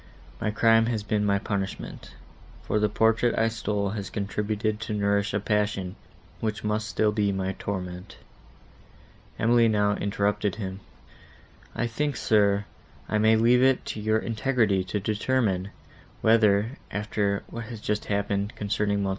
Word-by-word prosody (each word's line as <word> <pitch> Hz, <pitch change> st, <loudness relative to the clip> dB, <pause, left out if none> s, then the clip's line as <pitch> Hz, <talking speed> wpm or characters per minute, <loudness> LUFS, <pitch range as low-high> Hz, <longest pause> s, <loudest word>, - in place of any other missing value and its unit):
My 105 Hz, -, -1 dB
crime 115 Hz, +1 st, +4 dB
has 110 Hz, -3 st, -1 dB
been 105 Hz, 0 st, 0 dB
my 100 Hz, -1 st, +2 dB
punishment; 100 Hz, -1 st, -5 dB, 0.5 s
for 105 Hz, -, 0 dB
the 105 Hz, 0 st, +2 dB
portrait 115 Hz, +3 st, +2 dB
I 115 Hz, 0 st, +3 dB
stole 105 Hz, -3 st, -2 dB
has 100 Hz, -3 st, -4 dB
contributed 105 Hz, +1 st, -2 dB
to 110 Hz, -1 st, -3 dB
nourish 100 Hz, 0 st, +1 dB
a 100 Hz, -, 0 dB
passion, 105 Hz, -3 st, -1 dB, 0.4 s
which 110 Hz, -1 st, -3 dB
must 105 Hz, 0 st, -1 dB
still 110 Hz, 0 st, +1 dB
be 105 Hz, -1 st, +1 dB
my 95 Hz, 0 st, -1 dB
torment." 90 Hz, -2 st, -5 dB, 1.2 s
Emily 115 Hz, 0 st, +4 dB
now 105 Hz, -2 st, +2 dB
interrupted 100 Hz, -1 st, 0 dB
him. 95 Hz, -3 st, -5 dB, 1.0 s
"I -, -, 0 dB
think, 140 Hz, +5 st, -1 dB
sir, 100 Hz, -3 st, +2 dB, 0.4 s
I 105 Hz, -, 0 dB
may 110 Hz, +1 st, +5 dB
leave 120 Hz, +3 st, +4 dB
it 130 Hz, 0 st, +3 dB
to -, -, -7 dB
your 110 Hz, +1 st, +2 dB
integrity 110 Hz, -3 st, +1 dB
to 100 Hz, +3 st, -2 dB
determine, 105 Hz, -2 st, 0 dB, 0.5 s
whether, 110 Hz, +2 st, +3 dB
after 105 Hz, -1 st, -1 dB
what 115 Hz, 0 st, -7 dB
has 115 Hz, -1 st, -8 dB
just 105 Hz, 0 st, -2 dB
appeared, 100 Hz, +1 st, -1 dB
concerning 100 Hz, -1 st, 0 dB
Mons. 95 Hz, -, 0 dB
105 Hz, 145 wpm, -26 LUFS, 100-110 Hz, 1.2 s, may